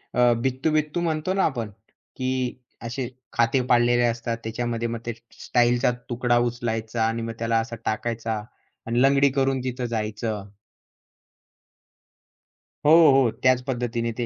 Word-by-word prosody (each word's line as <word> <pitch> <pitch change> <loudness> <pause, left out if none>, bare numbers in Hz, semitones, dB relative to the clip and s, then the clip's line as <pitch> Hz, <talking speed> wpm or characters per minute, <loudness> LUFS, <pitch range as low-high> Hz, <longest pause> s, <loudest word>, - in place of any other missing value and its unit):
अ, 120 -1 +5
बित्तू-बित्तू 150 +5 0
म्हणतो 165 +2 -1
ना 195 - +1
आपण 115 -7 -2 0.5
की 130 0 -1 0.5
असे 120 +1 -4 0.2
खाते 115 +3 +2
पाडलेले 120 0 +4
असतात 115 0 -1
त्याच्यामध्ये 115 +1 -2
मग 115 0 -4
ते 120 - -2 0.4
टाइल 120 0 +5
चा 125 - +3 0.2
तुकडा 120 0 +1
उचलायचा 115 -1 -3
आणि 115 0 -2
मग 115 0 -4
त्याला 115 0 +1
असा 115 +1 -4
टाकायचा 115 0 -2 0.5
आणि 120 +2 +1
लंगडी 140 0 +5
करून 135 0 +1
तिथं 125 -1 -3
जायचं. 110 -2 -3 2.4
हो, 150 - +6 0.2
हो, 135 -3 +4
त्याच 130 -1 +4
पद्धतीने 120 -2 -2
ते 120 - -1
120 Hz, 135 wpm, -24 LUFS, 115-130 Hz, 2.4 s, हो